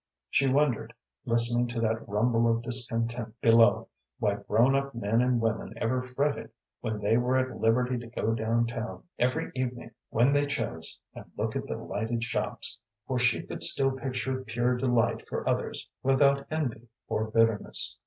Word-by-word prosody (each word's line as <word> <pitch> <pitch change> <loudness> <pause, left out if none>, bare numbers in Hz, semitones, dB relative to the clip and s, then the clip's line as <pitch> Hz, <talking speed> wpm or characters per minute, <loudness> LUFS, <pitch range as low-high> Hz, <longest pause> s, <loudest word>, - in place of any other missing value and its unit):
She 135 - +3
wondered, 130 -4 +1 0.3
listening 120 0 +2
to 120 -1 -3
that 110 -1 -1
rumble 115 +2 +2
of 115 0 -1
discontent 115 -1 -1
below, 115 -3 +5 0.3
why - - 0
grown 120 +5 +2
up 140 -1 -1
men 115 +1 +1
and 125 -1 +2
women 115 0 -2
ever 125 +3 0
fretted 135 +3 -2 0.3
when 110 -1 -3
they 105 +2 +2
were 125 +2 +2
at 130 0 -2
liberty 125 +2 +2
to 120 - -9
go 115 -1 -1
down 115 +1 +1
town 115 0 -5 0.2
every 125 +1 0
evening 125 -2 -4 0.2
when 125 +5 +3
they 145 0 +2
chose 115 - -3 0.2
and - - -10
look - - -2
at - - -3
the - - -3
lighted 115 +2 -3
shops, 115 - -3 0.3
for - - -1
she - - +2
could - - -7
still 135 -1 +6
picture 130 0 -3
pure 120 +1 0
delight 120 -2 +1
for - - -3
others - - -1
without 140 +1 +3
envy 125 -7 -3 0.2
or 110 0 -1
bitterness. 115 -1 +2
120 Hz, 165 wpm, -28 LUFS, 115-130 Hz, 0.3 s, still